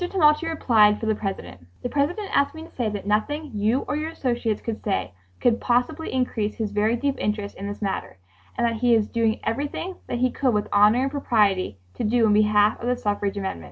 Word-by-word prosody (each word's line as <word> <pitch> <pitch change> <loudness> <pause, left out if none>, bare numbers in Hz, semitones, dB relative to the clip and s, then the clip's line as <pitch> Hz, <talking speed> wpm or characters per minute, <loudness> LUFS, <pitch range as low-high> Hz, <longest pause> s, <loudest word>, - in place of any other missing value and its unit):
Tumulty 310 -3 +3
replied 220 -10 +4
for - - -4
the 220 - +2
President: 195 - -5 0.2
"The 245 - -2
President 350 - -1
asks 280 +2 +2
me 320 - -8
to 330 - -13
say 240 -4 0
that 205 -2 -5
nothing 285 +9 -1
you 215 +5 +1
or - - -1
your 310 +1 -2
associates 240 -8 -1
could 225 -2 -5
say 195 - -1 0.3
could 235 -1 +2
possibly 245 +6 0
increase 230 -5 -1
his 220 -3 -3
very 210 +3 +1
deep 275 +3 -1
interest 210 -1 -2
in 200 - -6
this 205 +1 -6
matter 195 - -3 0.4
and - - +2
that 230 -1 0
he 240 -2 +5
is 215 -2 +1
doing 225 -1 0
everything 290 +10 -3
that - - -2
he 255 +1 +1
could 255 -5 +1
with 210 - 0
honor 210 +5 +5
and 270 - -1
propriety 205 - +1 0.3
do 235 +1 +3
in 210 - +4
behalf 210 0 +3
of 235 - -3
the 250 - +2
[suffrage] 245 -1 -15 0.3
amendment." 190 - -3
230 Hz, 215 wpm, -24 LUFS, 210-270 Hz, 0.4 s, he